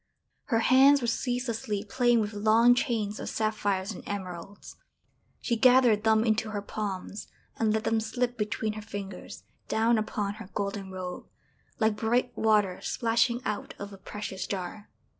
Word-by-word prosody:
Her 230 -4 +1
hands 270 +4 +6
were 245 - -3
ceaselessly 230 -3 -2
playing 240 0 +3
with 210 0 -3
long 220 +4 +5
chains 225 -5 -1
of - - -4
sapphires 205 -2 -1
and 195 - -9
emeralds. 190 -1 -7 0.6
She 235 - 0
gathered 245 -3 +5
them 220 0 +4
into 220 -1 +1
her 205 -1 -3
palms, 205 -1 -5 0.3
and 220 -1 +2
let 220 0 0
them 225 - +1
slip 245 +2 -2
between 215 -1 -2
her 215 - -7
fingers, 200 -3 -8 0.2
down 225 +1 +2
upon 205 -1 -2
her 200 - -10
golden 200 -1 -3
robe, 185 -1 -6 0.5
like 220 -2 +1
bright 240 +3 0
water 210 -4 +2
splashing 235 +1 +1
out 210 -1 -3
of 200 0 -7
a - - -10
precious 190 -1 -6
jar. 195 +2 -5
215 Hz, 155 wpm, -28 LUFS, 205-230 Hz, 0.6 s, hands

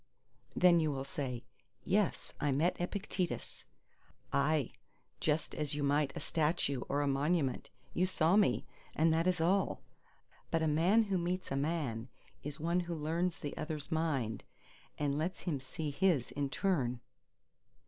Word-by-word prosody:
Then 175 -2 +6
you 155 -2 +1
will 135 -1 -3
say, 130 -3 -4 0.4
"Yes, 200 -1 0
I 145 - +2
met 160 +7 +1
Epictetus!" 185 -1 -3 0.7
Aye, 140 0 +2 0.5
just 155 0 0
as 150 -1 -2
you 145 - -1
might 145 0 +2
a - - -2
statue 150 -4 0
or 145 +1 +1
a - - 0
monument. 140 0 +1 0.2
You 180 +2 +2
saw 170 0 +3
me! 210 -1 +3 0.3
and 160 +1 +4
that 165 +2 +2
is 180 -1 +2
all. 185 +4 +1 0.7
But 165 -1 +1
a - - +2
man 175 +9 +4
who 195 -3 0
meets 180 +2 -2
a - - 0
man 140 -6 -1 0.3
is 145 0 -6
one 170 +3 +1
who 175 -1 -3
learns 165 +3 -1
the 145 - -5
other's 155 0 -5
mind, 140 -10 0 0.5
and 145 -1 0
lets 175 +4 -2
him 160 -7 -1
see 145 +3 -4
his 160 -5 +2
in 140 -1 -2
turn. 135 -9 0
155 Hz, 155 wpm, -34 LUFS, 140-175 Hz, 0.7 s, Then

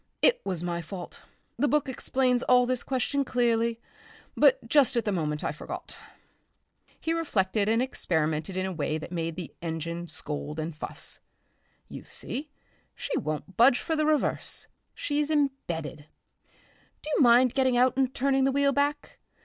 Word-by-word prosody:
It - - +5
was 180 -3 -2
my 170 -1 -2
fault. 175 +1 -8 0.4
The 290 - +3
book 295 0 +2
explains 255 -1 +1
all 250 -1 +5
this 255 0 -1
question 275 +2 0
clearly, 235 -2 +1 0.6
but - - +4
just 290 -6 +4
at 235 - +1
the 210 - +1
moment 150 -5 -1
I - - 0
forgot." - - -7 1.0
He 325 - -1
reflected 210 - +1
and 225 +2 +3
experimented 160 -7 -1
in 185 - 0
a 190 - -2
way 155 -1 -1
that 155 - -8
made 165 -2 -2
the 175 -3 -7
engine 170 +1 -4
scold 150 -1 -5
and 155 0 -4
fuss.... - - -5 0.7
"You - - -9
see, 290 +5 -4 0.5
she - - -3
won't 155 +4 -3
budge 245 +2 +6
for 320 - -2
the 305 -1 +1
reverse.... 305 -1 0 0.3
She's 295 0 -1
embedded.... 175 - -1 1.0
Do 305 - -6
you - - +3
mind 245 0 +6
getting 260 -2 +2
out 255 +2 +4
and 265 -1 +2
turning 270 0 +1
the 270 - +3
wheel 280 +1 +3
back? 285 +1 -1
240 Hz, 160 wpm, -28 LUFS, 170-275 Hz, 1.0 s, budge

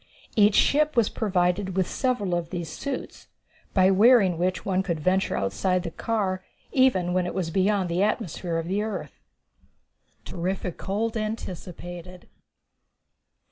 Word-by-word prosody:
Each 210 -2 +5
ship 305 0 +3
was 230 -3 +4
provided 190 -2 0
with 185 - +2
several 245 -9 -1
of 170 -1 -1
these 175 -3 -4
suits, 275 - -6 0.5
by 190 0 +5
wearing 200 -4 +5
which 180 0 -1
one 190 -1 +1
could 170 -4 -2
venture 185 +5 +1
outside 180 - 0
the 170 - -4
car 190 -2 -2 0.3
even 190 -10 +3
when 180 -1 +1
it - - -5
was 175 -4 -2
beyond 195 +1 +2
the 170 +2 0
atmosphere 185 -5 -1
of 165 0 -3
the 195 +3 0
earth. 215 0 -5 1.1
Terrific 180 0 -3
Cold 220 +4 -2
Anticipated. 180 -4 -6
185 Hz, 140 wpm, -26 LUFS, 175-210 Hz, 1.1 s, Each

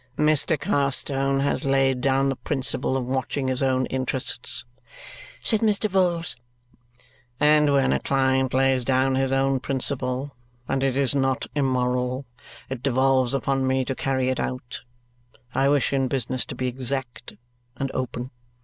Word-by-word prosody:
"Mr. 155 0 +2
Carstone 135 0 +1
has 140 - 0
laid 135 -2 +2
down 135 +1 +2
the 135 - -1
principle 135 -1 -2
of 130 - -3
watching 130 +1 -2
his 130 +1 -1
own 130 -1 +2
interests," 130 -1 -3 0.8
said 220 - +4
Mr. 215 -1 +2
Vholes, 180 -4 +1 1.0
"and 150 0 +4
when 140 - +3
a 65 - +1
client 130 - +1
lays 130 -1 +2
down 130 +1 +2
his 135 0 +1
own 135 0 +2
principle, 130 +1 -2 0.3
and 135 0 0
it 135 -1 +1
is 140 0 +3
not 135 -2 0
immoral, 125 -1 0 0.4
it 130 -2 -5
devolves 130 -1 +2
upon 135 +1 0
me 130 0 +1
to 135 - -2
carry 130 -1 0
it 130 - -1
out. 125 -1 -4 0.7
I 135 +2 +2
wish 140 -1 +2
in 135 -1 +1
business 130 -1 -2
to 140 - -6
be 130 - -3
exact 130 0 -4 0.4
and 135 +1 -2
open. 130 0 -4
135 Hz, 150 wpm, -24 LUFS, 130-140 Hz, 1.0 s, said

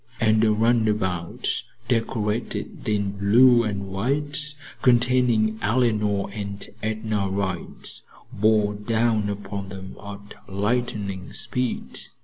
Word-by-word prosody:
and 110 -1 +3
a 110 - +4
runabout 105 -6 +1 0.3
decorated 115 -2 -2
in 100 -2 +1
blue 120 +4 +6
and 100 -3 -3
white, 145 +8 -1 0.3
containing 120 -3 +3
Eleanor 105 -3 +1
and 100 -1 -5
Edna 110 -2 -1
Wright, 95 -3 -4 0.3
bore 105 0 +3
down 110 0 +1
upon 100 -1 -5
them 95 -1 -8
at 100 0 -9 0.2
lightning 100 -2 -2
speed. 125 -1 -1
105 Hz, 100 wpm, -24 LUFS, 100-115 Hz, 0.3 s, blue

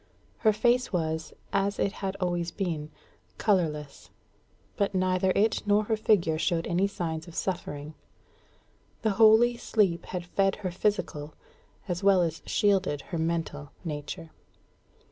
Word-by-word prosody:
Her 220 - +4
face 240 +4 +2
was, 160 -3 -2 0.2
as 195 +1 +1
it 200 - +1
had 195 -1 -4
always 175 -2 -1
been, 165 -5 -3 0.5
colourless; 150 -8 0 0.7
but 200 -1 0
neither 185 0 +2
it 215 +2 +2
nor 205 +1 +4
her 220 +1 0
figure 175 -7 +2
showed 165 0 0
any 180 +3 +1
signs 165 -4 -4
of 170 - -11
suffering. 155 -5 -3 1.1
The 220 - +3
holy 225 +2 +6
sleep 195 -8 +1
had 180 -2 -4
fed 195 +2 +1
her 185 - 0
physical 175 -6 -2 0.5
as 175 0 -3
well 195 -2 +5
as 165 -1 -2
shielded 190 -8 +2
her 170 - 0
mental 160 -3 -2
nature. 155 +2 -5
180 Hz, 135 wpm, -28 LUFS, 160-200 Hz, 1.1 s, holy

